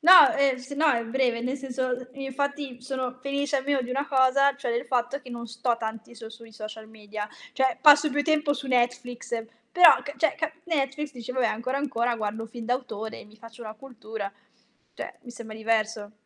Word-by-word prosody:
No, 360 +3 +9
ehm, 275 -2 +3
se 260 +3 -8
no 310 +3 +2
è 235 -3 +1
breve, 240 0 +1
nel 255 +3 -2
senso, 260 -1 -3
uhm, 250 0 -3
infatti 280 -1 -3
sono 255 -1 -4
felice 280 +1 -1
almeno 275 0 +1
di 250 - -6
una 275 +3 -1
cosa, 275 +1 +4
cioè 265 -4 -3
del 235 +1 -1
fatto 250 +3 0
che 255 - -12
non 235 -1 -6
sto 235 +1 -1
tanti 220 +1 -6
so 225 -1 -9
sui 225 0 -13
social 215 0 -8
media, 215 -1 -7 0.2
cioè 265 -1 +1
passo 295 0 +7
più 290 +2 +1
tempo 300 -1 +2
su 280 - -5
Netflix, 245 -2 -1 0.3
però 360 -1 +8
ca 285 - -6
cioè 320 - +2
ca 315 0 -2
Netflix 295 -2 -1
dici: 245 -1 -7
"Vabbè, 255 -2 +2
ancora, 255 +5 -1
ancora 245 -4 0
guardo 215 0 -3
un - - -9
film 230 +1 -8
d'autore 230 -3 -3
e - - -12
mi 210 +1 -19
faccio 230 +1 -12
una 215 -1 -7
cultura", 220 -4 -7 0.6
cioè - - -7
mi 245 - -10
sembra 225 -2 -9
diverso. 220 -1 -1
250 Hz, 205 wpm, -26 LUFS, 230-275 Hz, 0.6 s, No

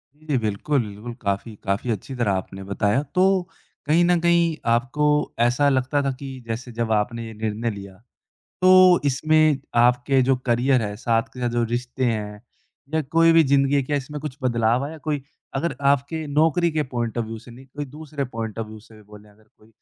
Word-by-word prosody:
जी, 150 -3 -2
बिल्कुल, 115 +6 0
बिल्कुल। 105 +4 -8
काफ़ी, 100 +1 -2
काफ़ी 100 +5 -2
अच्छी 110 +6 -5
तरह 120 -5 0
आपने 95 +1 -4
बताया। 100 +5 0
तो 185 - +4 0.6
कहीं 160 +4 +3
न 175 -1 +3
कहीं 170 -1 +3 0.2
आपको 130 +5 +1 0.3
ऐसा 125 +5 +3
लगता 130 +1 +1
था 135 - 0
कि 135 -2 -7
जैसे 120 +2 -5
जब 115 -1 -2
आपने 115 +2 0
ये 110 - -9
निर्णय 110 +2 -2
लिया, 100 -2 -9 0.7
तो 185 -1 +7
इसमें 155 +1 +3 0.2
आपके 125 +2 +3
जो 135 - +5
करियर 125 +1 +2
है, 105 -1 -3
साथ 115 +1 +1
के 125 - -10
साथ 120 -1 0
जो 120 0 0
रिश्ते 125 +1 -2
हैं 105 -3 -2 0.5
या 160 - +2
कोई 165 0 +6
भी 165 -1 +6
ज़िंदगी 140 0 +2
है, 140 - +3
क्या 145 +2 -1
इसमें 150 +2 -6
कुछ 145 -2 -6
बदलाव 120 0 +1
आया 160 +2 -7
कोई? 150 -2 -3 0.3
अगर 165 +5 -1 0.2
आपके 145 +3 -2
नौकरी 160 +3 +2
के 155 -1 0
पॉइंट 120 -1 -2
ऑफ़ 115 - -1
व्यू 115 0 -6
से 120 +2 -14
नहीं, 125 +3 -13
कोई 145 +2 -6
दूसरे 150 0 -6
पॉइंट 110 -1 -4
ऑफ़ 110 - -3
व्यू 110 0 -10
से 110 +1 -18
भी 110 - -16
बोलें 105 0 -15
अगर 105 +1 -24
कोई, 110 - -22
125 Hz, 200 wpm, -23 LUFS, 110-145 Hz, 0.7 s, तो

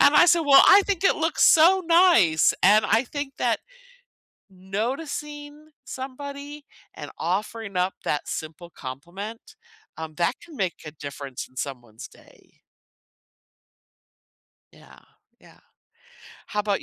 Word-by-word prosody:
and 290 - +5
I - - +7
said, 340 -1 +4
"Well, 275 -1 +7
I 405 - +8
think 395 -2 -3
it - - +4
looks 320 0 +1
so 345 +4 +6
nice," 330 - +4
and 210 +3 +5
I 225 +4 +2
think 285 +1 -6
that - - 0 0.9
noticing 290 - -6
somebody 280 +2 -8 0.3
and - - -9
offering 200 +4 -4
up 180 +1 0
that 150 - -2
simple 160 +2 -7
compliment, 175 - -9 0.4
um, 160 -1 -7
that 170 +1 -1
can 335 -3 -14
make 185 -3 -1
a 150 - -7
difference 140 -3 -8
in 130 - -24
someone's 120 -5 -7
day. - - -23 2.1
Yeah, - - -18 0.4
yeah. - - -20 0.9
How 210 0 -2
'bout 205 -1 -1
220 Hz, 125 wpm, -24 LUFS, -, 2.1 s, I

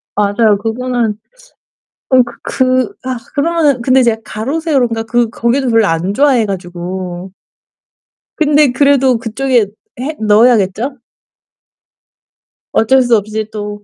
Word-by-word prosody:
맞아요. 205 +1 +2
그거는 230 0 -2 0.9
어 260 -1 +5
그 235 0 -10
그 255 +8 0
아 260 -1 -3 0.2
그러면은 295 -3 +1
근데 255 +1 +3
제가 225 -2 +1
가로세로인가 250 -2 -1
그 235 0 0
거기도 245 +3 0
별로 225 -2 +3
안 175 +4 -1
좋아해 270 -4 +3
가지고 180 0 -6 1.0
근데 295 -3 +3
그래도 270 -2 +3
그쪽에 235 -1 0 0.3
해 300 +4 -4
넣어야겠죠? 220 +3 +2 1.8
어쩔 260 +4 +3
수 240 -2 +3
없이 215 +1 -4
또 205 -1 -6
235 Hz, 245 characters per minute, -14 LUFS, 210-260 Hz, 1.8 s, 어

